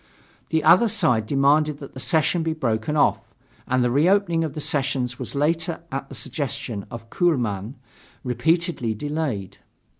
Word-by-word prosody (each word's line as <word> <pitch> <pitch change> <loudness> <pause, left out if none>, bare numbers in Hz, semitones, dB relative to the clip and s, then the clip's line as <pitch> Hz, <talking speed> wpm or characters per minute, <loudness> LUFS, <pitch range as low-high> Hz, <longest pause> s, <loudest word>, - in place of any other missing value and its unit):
The 160 -1 +1
other 175 +9 +6
side 125 - +1
demanded 145 +3 +2
that 140 -2 -11
the 130 - -8
session 160 +4 +1
be 160 0 -1
broken 125 -1 -1
off, - - +3 0.5
and 130 0 +2
the 120 - +1
reopening 170 +4 +3
of 155 -3 -4
the - - -4
sessions 135 -4 -1
was - - -6
later, 165 +4 0
at 135 0 -4
the - - -9
suggestion 125 -6 -3
of 115 -1 -10
Kuehlmann, 120 - 0 0.5
repeatedly 160 -2 0
delayed. 130 - -4
140 Hz, 150 wpm, -23 LUFS, 125-160 Hz, 0.5 s, other